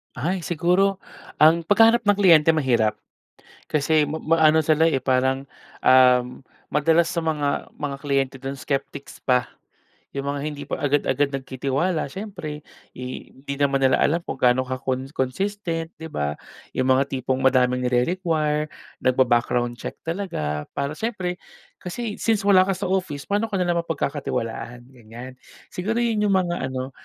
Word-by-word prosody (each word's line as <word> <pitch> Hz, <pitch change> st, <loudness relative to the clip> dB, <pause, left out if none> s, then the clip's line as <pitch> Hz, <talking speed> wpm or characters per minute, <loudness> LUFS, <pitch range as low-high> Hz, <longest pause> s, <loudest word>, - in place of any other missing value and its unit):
Ay, 180 Hz, +1 st, -2 dB
siguro 180 Hz, +4 st, +1 dB, 0.4 s
ang 165 Hz, +2 st, +6 dB
paghahanap 225 Hz, +4 st, +5 dB
ng 205 Hz, -, +5 dB
kliyente 165 Hz, -5 st, +6 dB
mahirap. 115 Hz, -8 st, +1 dB, 0.6 s
Kasi 155 Hz, +1 st, +2 dB
ma 155 Hz, +2 st, -4 dB
maano 160 Hz, -1 st, +4 dB
sila 155 Hz, +1 st, +3 dB
eh, 160 Hz, -5 st, +2 dB
parang, 130 Hz, +1 st, 0 dB, 0.3 s
um, 125 Hz, 0 st, +4 dB, 0.2 s
madalas 160 Hz, +3 st, +3 dB
sa 170 Hz, -2 st, -2 dB
mga 150 Hz, -3 st, -1 dB
mga 145 Hz, -2 st, -4 dB
kliyente 135 Hz, -2 st, 0 dB
dun 135 Hz, +1 st, -5 dB
skeptics 140 Hz, +1 st, -5 dB
pa, 125 Hz, -1 st, +2 dB, 0.6 s
yung 140 Hz, 0 st, -4 dB
mga 145 Hz, -, -4 dB
hindi 145 Hz, -1 st, -5 dB
pa -, -, -3 dB
agad-agad 145 Hz, -1 st, +1 dB
nagtitiwala 135 Hz, +5 st, -2 dB
siyempre 175 Hz, -4 st, -7 dB, 0.3 s
eh, 125 Hz, 0 st, -7 dB
hindi 140 Hz, +1 st, -6 dB
naman 140 Hz, -1 st, +2 dB
nila 130 Hz, -, +4 dB
alam 170 Hz, +3 st, +1 dB
kung 135 Hz, -, -5 dB
gaano 125 Hz, +1 st, +3 dB
ka 130 Hz, 0 st, -3 dB
con 130 Hz, -1 st, -2 dB
consistent, 165 Hz, +4 st, -2 dB
'di 160 Hz, +1 st, -8 dB
ba? 75 Hz, -, -2 dB, 0.4 s
Yung 130 Hz, -, 0 dB
mga 135 Hz, +1 st, +3 dB
tipong 130 Hz, -1 st, -2 dB
madaming 125 Hz, -1 st, +2 dB
nire-require 150 Hz, +3 st, 0 dB, 0.3 s
nagba-background 120 Hz, -1 st, +1 dB
check -, -, -6 dB
talaga 120 Hz, -, -3 dB
para 140 Hz, 0 st, -2 dB
siyempre, 180 Hz, 0 st, -3 dB, 0.4 s
kasi 210 Hz, +4 st, -5 dB
since 220 Hz, -3 st, +1 dB
wala 195 Hz, -2 st, +6 dB
ka -, -, +2 dB
sa 190 Hz, -, -3 dB
office, 180 Hz, -7 st, -2 dB
paano 205 Hz, +3 st, 0 dB
ka 210 Hz, -, -4 dB
nila 175 Hz, -1 st, +1 dB
mapagkakatiwalaan? 125 Hz, -6 st, -4 dB
Ganyan, 125 Hz, +1 st, -11 dB, 0.3 s
siguro 215 Hz, +6 st, -2 dB
yun 215 Hz, -3 st, +1 dB
yung 195 Hz, -, +3 dB
mga 175 Hz, -7 st, 0 dB
ano 130 Hz, 0 st, -5 dB
145 Hz, 150 wpm, -23 LUFS, 130-175 Hz, 0.6 s, ang